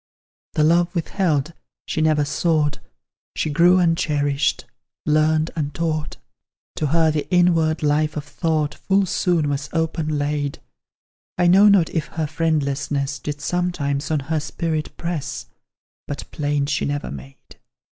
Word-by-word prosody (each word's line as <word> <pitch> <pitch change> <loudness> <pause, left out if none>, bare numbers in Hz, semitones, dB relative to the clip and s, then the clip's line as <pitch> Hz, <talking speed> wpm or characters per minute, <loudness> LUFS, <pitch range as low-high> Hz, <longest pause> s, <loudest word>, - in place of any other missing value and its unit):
The 155 - +2
love 170 +3 +3
withheld 165 -3 0 0.3
she 155 - -2
never 155 -2 +3
sought, 150 -1 0 0.6
She 155 - -1
grew 175 +4 +5
uncherished 150 -5 +1 0.4
learnt 155 +1 +2
untaught; 155 0 -2 0.6
To 155 - 0
her 160 +1 +3
the 150 -1 -3
inward 165 -3 +3
life 150 +1 +1
of 150 - -3
thought 150 0 -1
Full 195 +4 +1
soon 175 -4 +1
was 140 0 -2
open 160 -2 -1
laid. 145 -1 -1 0.8
I 180 - +2
know 190 +4 +7
not 190 -5 +4
if 160 - -2
her 160 -1 -3
friendlessness 145 -3 -1
Did 145 +2 -5
sometimes 170 -5 -1
on 155 -2 0
her 155 +3 -1
spirit 155 0 -3
press, 170 -4 -4 0.6
But 145 - -6
plaint 145 -1 -1
she 145 - 0
never 145 0 -3
made. 135 0 -12
155 Hz, 135 wpm, -22 LUFS, 145-165 Hz, 0.8 s, know